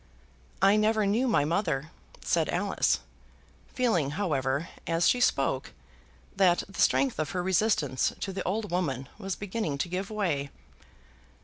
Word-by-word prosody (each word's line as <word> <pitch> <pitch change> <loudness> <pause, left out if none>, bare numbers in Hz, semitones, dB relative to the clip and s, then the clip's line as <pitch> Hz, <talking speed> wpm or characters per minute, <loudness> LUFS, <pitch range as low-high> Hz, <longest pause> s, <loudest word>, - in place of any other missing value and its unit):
"I 200 +2 +6
never 215 0 +2
knew 225 +6 +2
my 210 -11 +3
mother," 160 -3 -1 0.3
said - - +1
Alice, - - +1 0.7
feeling, 220 - +1
however, 145 -5 0 0.2
as 165 0 +2
she 250 - +3
spoke, 135 - +1 0.6
that 180 -3 +3
the 195 - -4
strength 270 -9 +2
of 155 -2 -1
her 180 -1 -1
resistance 180 - +1
to 195 - -4
the 190 - -3
old 210 +2 -2
woman 135 -8 -2
was 195 -3 -3
beginning 200 -7 -3
to 175 - -2
give 185 +2 -3
way. 170 -10 -1
185 Hz, 140 wpm, -28 LUFS, 150-210 Hz, 0.7 s, I